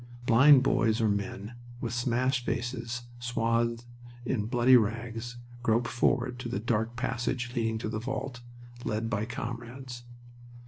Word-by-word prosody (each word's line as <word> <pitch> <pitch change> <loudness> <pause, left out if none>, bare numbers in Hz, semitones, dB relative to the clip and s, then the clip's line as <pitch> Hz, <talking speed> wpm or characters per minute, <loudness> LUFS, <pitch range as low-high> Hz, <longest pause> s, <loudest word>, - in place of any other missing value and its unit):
Blind 130 +4 +7
boys 115 -3 +2
or 110 - +3
men 100 +2 -2 0.3
with 120 -2 -3
smashed 125 +2 +1
faces 120 -1 -3 0.2
swathed 115 0 0 0.4
in 110 -5 -1
bloody 125 +2 +5
rags 115 +1 0 0.2
groped 115 0 +2
forward 125 0 +1
to 120 - -4
the 110 - -2
dark 115 +1 0
passage 125 +1 -2
leading 110 -2 0
to 110 - -4
the 110 0 -2
vault, 130 0 -4 0.4
led 110 +1 -2
by 105 0 0
comrades. 120 +2 -6
120 Hz, 135 wpm, -29 LUFS, 115-125 Hz, 0.4 s, Blind